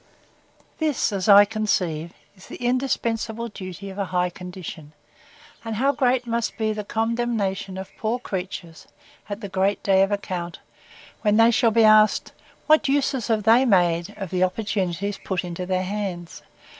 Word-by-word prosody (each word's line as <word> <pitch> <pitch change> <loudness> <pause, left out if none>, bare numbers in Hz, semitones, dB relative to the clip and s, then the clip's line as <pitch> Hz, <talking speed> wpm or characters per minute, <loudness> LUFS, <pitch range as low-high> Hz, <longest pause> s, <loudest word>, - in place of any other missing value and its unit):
This, 305 -7 0
as 195 0 -1
I 205 0 +9
conceive, 180 -7 -1 0.2
is 185 - -16
the - - -8
indispensable 235 -2 -1
duty 195 -1 -8
of 190 - -9
a 200 - 0
high 180 -1 0
condition; 180 -4 -9 0.7
and 225 -1 -4
how 270 +6 +2
great 255 -2 +1
must 235 -1 -2
be 220 -1 0
the 210 0 -5
condemnation 220 -4 -2
of 190 0 -8
poor 225 +2 0
creatures, 180 -7 -6 0.4
at 205 +2 -5
the 200 - -5
great 195 +1 0
day 190 -1 +4
of 195 +1 +2
account, 180 -4 -4 0.6
when 210 -1 +2
they 225 +1 +6
shall 235 0 +3
be 225 +1 +3
asked, 215 0 +5 0.3
What 310 -1 +4
uses 275 -3 0
they 225 +1 +4
have 265 - +2
made 175 0 +2
of 195 -4 -6
the 185 0 +1
opportunities 195 0 -2
put 190 -2 -2
into 180 +1 -5
their 185 0 0
hands? 185 -3 -5
205 Hz, 160 wpm, -23 LUFS, 185-230 Hz, 0.7 s, I